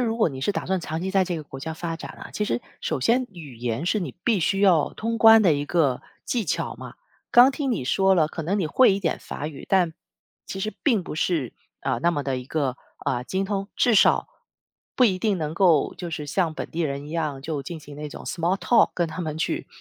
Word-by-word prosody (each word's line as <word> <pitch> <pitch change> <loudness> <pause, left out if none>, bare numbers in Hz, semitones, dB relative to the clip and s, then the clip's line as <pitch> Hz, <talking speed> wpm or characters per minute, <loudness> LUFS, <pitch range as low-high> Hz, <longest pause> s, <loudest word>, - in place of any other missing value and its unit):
如 230 -2 0
果 215 - +3
你 130 -2 -7
是 205 - 0
打 - - -4
算 190 -1 0
长 160 0 -4
期 190 - -2
在 190 -1 +3
这 175 -2 -3
个 155 - -5
国 135 -2 -10
家 160 +2 -4
发 165 0 -4
展 - - -8
啊， - - -9
其 210 - -1
实 120 - -1 0.2
首 - - -2
先 245 - +2
语 150 -9 -10
言 120 +5 -2
是 215 - +1
你 160 -8 -5
必 225 -6 +2
须 195 +4 +1
要 175 -7 +4
通 230 +1 -2
关 225 -1 +8
的 175 - +5
一 145 0 -1
个 145 -6 +1 0.2
技 235 -3 -1
巧 - - -2
嘛。 - - -9 0.4
刚 245 +2 +8
听 275 0 -2
你 215 - -1
说 190 +7 +3
了， 160 -4 +3
可 165 - -6
能 195 +6 0
你 180 - 0
会 230 +6 +5
一 195 - -3
点 165 -4 -1
法 145 - -6
语， 150 -3 -8
但 180 -4 +3 0.5
其 190 - -5
实 215 +2 -2
并 230 -10 +2
不 - - -7
是， 155 -5 -1 0.3
呃， - - -1
那 170 - +3
么 145 -4 -2
地 135 -1 -2
一 125 - -8
个， 135 -2 -1 0.3
呃， 120 - 0
精 190 +6 -1
通， 195 0 -3
至 240 - +3
少 200 - +4 0.7
不 255 - +5
一 190 -5 +2
定 205 -1 +1
能 155 -2 -3
够 170 -4 +3
就 175 - -6
是 155 -3 -4
像 160 +1 0
本 - - -6
地 170 - -4
人 140 -2 -2
一 - - -9
样 155 -5 -2
就 150 -2 -3
进 165 +4 -7
行 150 -1 -12
那 150 0 -5
种 - - -10
small 175 +2 0
talk 235 +2 +4
跟 175 -2 +1
他 160 +3 -6
们 155 -3 -3
去 160 - -2
170 Hz, 290 characters per minute, -24 LUFS, 150-195 Hz, 0.7 s, 关